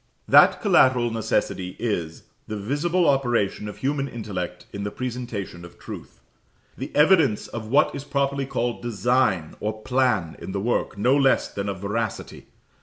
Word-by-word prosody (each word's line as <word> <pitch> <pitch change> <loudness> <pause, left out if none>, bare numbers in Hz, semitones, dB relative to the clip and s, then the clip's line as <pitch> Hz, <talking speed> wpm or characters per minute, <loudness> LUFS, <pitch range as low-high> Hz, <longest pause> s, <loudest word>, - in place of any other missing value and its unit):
That - - +6
collateral 125 -2 +4
necessity 95 -4 -1
is 85 -8 -3 0.3
_the 110 -1 -4
visible 165 - +1
operation 120 -7 +1
of - - -9
human 140 0 -1
intellect 90 -7 -5
in 100 - -4
the 105 - -2
presentation 120 -7 -5
of 85 - -13
truth, - - -10 0.5
_the - - -6
evidence 150 - +4
of 110 -2 -6
what 140 +6 +3
is 140 - -5
properly 140 -1 -1
called 120 -3 -2
design 120 -7 +1
or 110 +1 -4
plan 125 -10 +1
in 95 - -7
the 100 - -1
work, 110 0 -1
no 125 +7 +3
less 135 -2 +3
than 100 0 -4
of 95 -2 -5
veracity. 110 +1 -4
115 Hz, 155 wpm, -24 LUFS, 100-135 Hz, 0.5 s, That